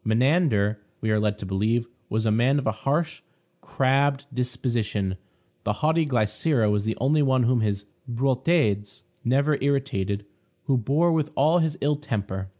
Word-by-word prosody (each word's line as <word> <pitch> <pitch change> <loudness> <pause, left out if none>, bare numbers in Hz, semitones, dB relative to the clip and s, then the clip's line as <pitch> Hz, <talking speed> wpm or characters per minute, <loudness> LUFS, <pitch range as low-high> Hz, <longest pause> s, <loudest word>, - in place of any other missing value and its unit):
Menander, 110 - +2 0.2
we 110 - -1
are 105 - +2
led 105 -1 0
to 100 - -7
believe, 110 +5 0 0.2
was 110 +1 -1
a 110 - +2
man 120 +6 +3
of 140 - -2
a - - +2
harsh, 145 +9 -2 0.4
crabbed 140 +1 +1
disposition; 120 -6 -2 0.5
the 105 - 0
haughty 160 +1 +3
Glycera 115 0 +1
was 105 0 0
the 110 - -2
only 150 +5 +2
one 130 -2 +3
whom 120 0 +2
his 100 -2 -1 0.2
boutades 125 - 0 0.2
never 140 +4 +1
irritated, 130 -8 -1 0.4
who 135 - +1
bore 145 +8 +2
with 155 -2 0
all 155 +6 +4
his 160 0 0
ill 145 +1 +1
temper. 100 -8 -4
125 Hz, 155 wpm, -25 LUFS, 105-140 Hz, 0.5 s, all